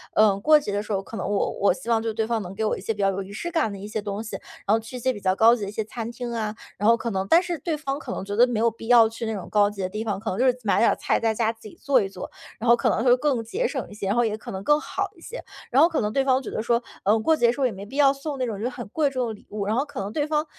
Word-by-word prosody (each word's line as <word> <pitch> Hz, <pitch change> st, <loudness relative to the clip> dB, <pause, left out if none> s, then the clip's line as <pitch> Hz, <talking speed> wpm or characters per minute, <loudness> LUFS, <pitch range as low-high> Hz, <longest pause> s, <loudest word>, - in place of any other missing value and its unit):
呃， 210 Hz, -2 st, +5 dB
过 305 Hz, +7 st, +6 dB
节 210 Hz, -, -5 dB
的 205 Hz, +1 st, -1 dB
时 215 Hz, -, -8 dB
候， 195 Hz, -1 st, 0 dB
可 225 Hz, -, -10 dB
能 -, -, -3 dB
我 205 Hz, -, 0 dB
我 200 Hz, -, +4 dB
希 260 Hz, -, -6 dB
望 225 Hz, -1 st, +3 dB
就 225 Hz, -, -2 dB
对 220 Hz, 0 st, -1 dB
方 225 Hz, -1 st, -1 dB
能 190 Hz, 0 st, -8 dB
给 220 Hz, +2 st, -1 dB
我 -, -, +1 dB
一 -, -, -8 dB
些 -, -, -2 dB
比 -, -, -16 dB
较 195 Hz, -1 st, +3 dB
有 195 Hz, +1 st, -3 dB
仪 195 Hz, +1 st, -9 dB
式 345 Hz, +12 st, -5 dB
感 315 Hz, -, +1 dB
的 200 Hz, -, -7 dB
一 200 Hz, +2 st, -8 dB
些 215 Hz, 0 st, -3 dB
东 205 Hz, +1 st, -4 dB
西， 220 Hz, -, -6 dB, 0.3 s
然 205 Hz, -, +3 dB
后 225 Hz, -, +1 dB
去 225 Hz, +3 st, -10 dB
一 -, -, -4 dB
些 260 Hz, +2 st, 0 dB
比 205 Hz, -, -8 dB
较 185 Hz, 0 st, +2 dB
高 230 Hz, +3 st, +6 dB
级 235 Hz, -, -8 dB
的 -, -, -5 dB
一 -, -, -6 dB
些 220 Hz, -, -2 dB
餐 230 Hz, 0 st, -6 dB
厅 240 Hz, 0 st, -6 dB
啊， 215 Hz, -2 st, -3 dB, 0.2 s
然 210 Hz, -, +3 dB
后 230 Hz, -, +5 dB
可 235 Hz, 0 st, -3 dB
能 190 Hz, -1 st, -2 dB
但 335 Hz, -, +6 dB
是 345 Hz, -4 st, -3 dB
对 325 Hz, -3 st, -2 dB
方 280 Hz, -2 st, -3 dB
可 260 Hz, -, -7 dB
能 195 Hz, -, -4 dB
觉 205 Hz, +1 st, -4 dB
得 245 Hz, +3 st, +6 dB
没 235 Hz, -3 st, -1 dB
有 230 Hz, -, +4 dB
必 225 Hz, +1 st, -11 dB
要 235 Hz, -2 st, +7 dB
去 230 Hz, +1 st, -6 dB
那 220 Hz, -, -2 dB
种 195 Hz, -4 st, -6 dB
高 205 Hz, -1 st, +4 dB
级 205 Hz, -2 st, -7 dB
的 185 Hz, -, -2 dB
地 215 Hz, +3 st, -4 dB
方， 205 Hz, -3 st, -2 dB
可 220 Hz, +2 st, -4 dB
能 190 Hz, -, -3 dB
就 260 Hz, -, +3 dB
是 250 Hz, 0 st, +2 dB
买 205 Hz, -, +2 dB
点 230 Hz, -, +5 dB
儿 -, -, 0 dB
菜 -, -, 0 dB
在 225 Hz, -1 st, +1 dB
家 220 Hz, 0 st, +1 dB
自 225 Hz, -1 st, -14 dB
己 -, -, -13 dB
做 270 Hz, -4 st, +3 dB
一 195 Hz, -, -2 dB
做， 185 Hz, -2 st, -8 dB, 0.3 s
然 235 Hz, -, -1 dB
后 235 Hz, -, +8 dB
可 -, -, +1 dB
能 225 Hz, -, 0 dB
会 250 Hz, -1 st, +6 dB
更 260 Hz, -5 st, 0 dB
节 455 Hz, -, -1 dB
省 265 Hz, -5 st, -4 dB
一 -, -, -11 dB
些， 205 Hz, -2 st, -5 dB
然 200 Hz, -, +1 dB
后 240 Hz, -, +3 dB
也 215 Hz, -1 st, -1 dB
可 -, -, -9 dB
能 190 Hz, 0 st, -5 dB
更 295 Hz, +4 st, +4 dB
好 390 Hz, +5 st, -3 dB
一 -, -, -18 dB
些。 485 Hz, +8 st, -8 dB, 0.3 s
然 260 Hz, +3 st, +5 dB
后 330 Hz, -, +6 dB
可 325 Hz, -, -1 dB
能 210 Hz, -, -1 dB
对 275 Hz, -, +2 dB
方 265 Hz, 0 st, +2 dB
觉 -, -, -7 dB
得 -, -, -3 dB
说， 235 Hz, 0 st, +2 dB, 0.2 s
嗯， 215 Hz, +3 st, +3 dB
过 320 Hz, +7 st, +3 dB
节 240 Hz, -5 st, +3 dB
的 235 Hz, -, +3 dB
时 -, -, -9 dB
候 270 Hz, -, +2 dB
也 250 Hz, -, +1 dB
没 195 Hz, 0 st, -8 dB
必 270 Hz, +7 st, -9 dB
要 275 Hz, -1 st, +5 dB
送 280 Hz, +1 st, -5 dB
那 255 Hz, -, -1 dB
种 215 Hz, -4 st, -4 dB
就 245 Hz, -, 0 dB
很 240 Hz, -2 st, -8 dB
贵 295 Hz, +4 st, +1 dB
重 255 Hz, -3 st, -2 dB
的 225 Hz, -, -4 dB
礼 210 Hz, -, -15 dB
物， 205 Hz, -1 st, -4 dB
然 215 Hz, +3 st, 0 dB
后 265 Hz, -, +2 dB
可 285 Hz, -, -8 dB
能 195 Hz, +1 st, -4 dB
对 295 Hz, -1 st, 0 dB
方 305 Hz, 0 st, 0 dB
225 Hz, 405 characters per minute, -24 LUFS, 210-260 Hz, 0.3 s, 后